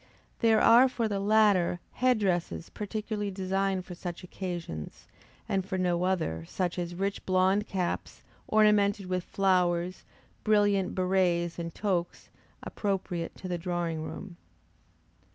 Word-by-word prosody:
There 225 -2 +4
are 245 +3 +7
for 235 -3 -1
the 200 -2 -2
latter, 200 -4 +3
head 255 -1 +2
dresses 175 -4 -1
particularly 210 0 -3
designed 190 0 -1
for 180 - -8
such 175 0 -6
occasions, 175 - -6 0.4
and 195 -1 0
for 190 0 -3
no 180 -1 +1
other, 160 - -1
such 180 -1 -2
as 175 0 -4
rich 195 +2 -2
blond 190 +3 +2
caps, 180 -3 -3 0.2
ornamented 210 -2 +3
with 185 -1 -2
flowers, 180 -2 +1 0.4
brilliant 205 -3 +2
berrets 180 -2 +1
and 170 0 -4
toques, 180 -4 -2 0.3
appropriate 185 -4 -3
to 185 - -8
the 175 -1 -2
drawing 170 -2 -2
room. 170 +3 -7
185 Hz, 130 wpm, -29 LUFS, 175-205 Hz, 0.4 s, are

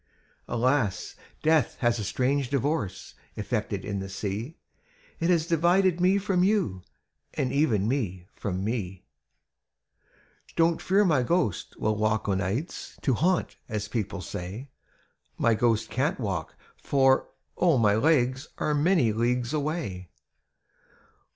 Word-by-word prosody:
''Alas! 120 -4 0 0.3
death 155 -5 +3
has 120 -2 +2
a - - -2
strange 130 +5 0
divorce 140 - -2 0.2
Effected 105 -2 -3
in 100 -1 -3
the 95 0 -5
sea. 105 +9 -4 0.6
It 170 - +1
has 170 -3 +3
divided 175 +2 +3
me 185 +2 +4
from 190 -2 +1
you, 185 - +1 0.5
And 125 - -1
even 115 -9 +2
me 100 -9 -2
from 95 -2 -3
me! 100 -5 -3 1.5
"Don't 165 0 +2
fear 200 +3 +3
my 155 -8 +3
ghost 125 - -1
will 110 -1 0
walk 110 0 0
o' 100 - +2
nights 100 - -3
To 135 - +2
haunt, 175 +8 +1
as 105 -1 -3
people 105 -4 -3
say; 100 +11 -7 0.7
My 115 - +3
ghost 115 0 +1
can't 145 +7 0
walk, 95 -8 -3 0.2
for, 135 -1 +2 0.3
oh! 170 -6 +3
my 105 -3 +4
legs 130 +2 +2
Are 150 - 0
many 150 - +3
leagues 120 +3 0
away! 145 - -3
125 Hz, 130 wpm, -27 LUFS, 105-155 Hz, 1.5 s, me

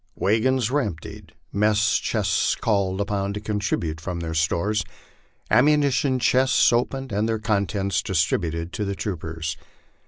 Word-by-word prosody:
Wagons 120 +3 +1
were 145 +1 +2
emptied, 85 - -7 0.2
mess 110 +2 +2
chests - - 0
called 100 -3 0
upon 100 -1 -1
to 105 - -4
contribute 105 -7 -2
from 90 0 -4
their 80 -1 -4
stores, 85 +6 0 0.7
ammunition 140 +1 +3
chests 130 0 +3
opened 130 +2 -1
and 105 +3 0
their 110 - 0
contents 100 -2 0
distributed 85 -1 -1
to 105 - -2
the 100 -1 -2
troopers. 80 -5 -4
105 Hz, 130 wpm, -23 LUFS, 90-115 Hz, 0.7 s, ammunition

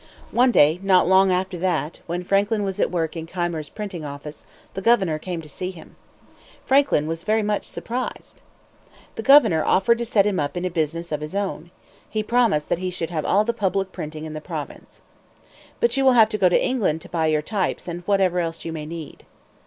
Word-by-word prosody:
One 250 +2 +4
day 155 -6 +4
not 190 -2 +4
long 190 +1 +5
after 185 0 -1
that, 170 -3 -1
when 175 +1 -3
Franklin 200 +3 +1
was 195 -1 -3
at - - +2
work 165 -2 -2
in 165 -1 -6
Keimer's 170 -4 -3
printing 200 -6 -6
office, 145 +1 -9 0.3
the 195 - -5
governor 190 -8 +2
came 170 0 -5
to - - -11
see 180 +5 -5
him. 175 -4 -12 0.7
Franklin 270 - +3
was 165 +1 -3
very 215 +3 +1
much 210 -1 -1
surprised. 250 +2 -6 0.7
The - - -5
governor 230 - +6
offered 230 +5 +3
to 235 - -1
set 210 -4 +3
him 205 -2 0
up 145 +4 -2
in 175 - -2
a 180 - -2
business 165 +1 -2
of 150 -1 -2
his 150 +5 -6
own. 190 -4 -3 0.4
He 215 -1 -2
promised 230 -10 +2
that - - 0
he 185 0 -2
should 175 -2 -4
have 155 -3 -2
all 205 +2 +3
the 235 - 0
public 195 -3 -1
printing 155 -1 -7
in 155 - -7
the 155 - -6
province. - - -8 0.8
"But 475 - +2
you 270 - +1
will 260 -1 +6
have 225 -3 +6
to 215 - -2
go 185 -2 +5
to - - +3
England 200 -11 0
to - - -11
buy 160 -2 0
your 155 -1 +1
types 195 +1 -2
and 175 0 -5
whatever 190 -3 +2
else 165 -1 -4
you 165 - -4
may 155 -2 -6
need." 160 -2 -9
180 Hz, 215 wpm, -23 LUFS, 160-205 Hz, 0.8 s, governor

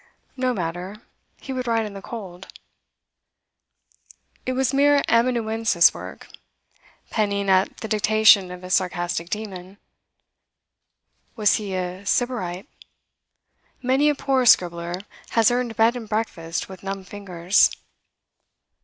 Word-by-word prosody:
No 255 -1 0
matter; 180 -1 -4 0.4
he 270 - -7
would 255 -1 -4
write 225 -1 +1
in 210 - -7
the 195 - -8
cold. 190 -5 -9 2.0
It 255 - 0
was 260 -1 0
mere 285 +1 +4
amanuensis 225 -5 +3
work, - - -10 0.8
penning 200 -2 0
at 190 +1 +2
the 220 - -4
dictation 215 -2 +4
of 180 0 -9
his 185 +1 -3
sarcastic 175 -2 -1
demon. 195 -3 -6 1.6
Was 210 -3 +3
he 200 -3 -5
a 185 +1 -4
sybarite? 200 -3 -1 1.2
Many 265 +4 +3
a 295 - +1
poor 265 -3 +1
scribbler 175 -1 +3 0.4
has 225 0 +5
earned 245 -2 -1
bed 225 +3 +3
and 225 -3 -7
breakfast 175 -7 -3
with 190 -2 -11
numb 195 0 -5
fingers. 185 -2 +1
205 Hz, 120 wpm, -23 LUFS, 185-235 Hz, 2.0 s, has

